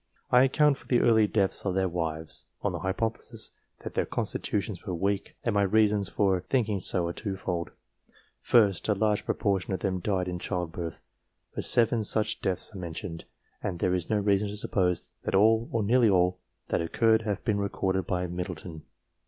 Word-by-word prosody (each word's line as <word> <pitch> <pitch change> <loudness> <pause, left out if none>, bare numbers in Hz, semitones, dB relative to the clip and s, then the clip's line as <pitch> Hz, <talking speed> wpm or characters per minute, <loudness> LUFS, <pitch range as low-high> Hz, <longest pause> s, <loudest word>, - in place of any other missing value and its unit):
I 125 +1 +7
account 145 +1 +3
for - - -18
the 120 - +3
early 110 -2 +5
deaths 100 -2 0
of 95 -2 -1
their 95 0 +2
wives, 80 -2 -3 0.2
on - - +1
the - - -4
hypothesis 110 +4 -3 0.3
that - - -6
their - - 0
constitutions 100 -3 -2
were 95 -4 -3
weak, 100 +3 -1
and 115 - 0
my 100 - +3
reasons 105 -1 +3
for 95 -3 +2
thinking 110 -3 0
so 90 -1 0
are 85 - -2
twofold. 95 -4 -3 0.7
First, 105 -4 +3
a - - +5
very - - -8
large 105 -1 +1
proportion 100 -2 0
of 90 - -7
them 95 -2 -1
died 95 -1 -1
in 90 -1 -3
childbirth, 85 -3 -4 0.5
for - - -3
seven 115 -1 +2
such 105 +1 -1
deaths 95 +3 -2
are 100 - -7
mentioned, 85 -1 -6 0.4
and 90 - -3
there 90 - +1
is 90 -2 -2
no 110 - +2
reason 100 0 +2
to 105 +1 -5
suppose 90 -4 0
that - - -1
all, 110 +3 +4
or 115 -2 0
nearly 115 +2 +4
all, 90 -1 +3 0.3
that - - +1
occurred 110 +7 +3
have 105 -3 -3
been 105 -3 +1
recorded 95 -2 -1
by 90 -1 0
Middle 90 +1 -4
ton. 80 0 -9
100 Hz, 190 wpm, -28 LUFS, 90-110 Hz, 0.7 s, I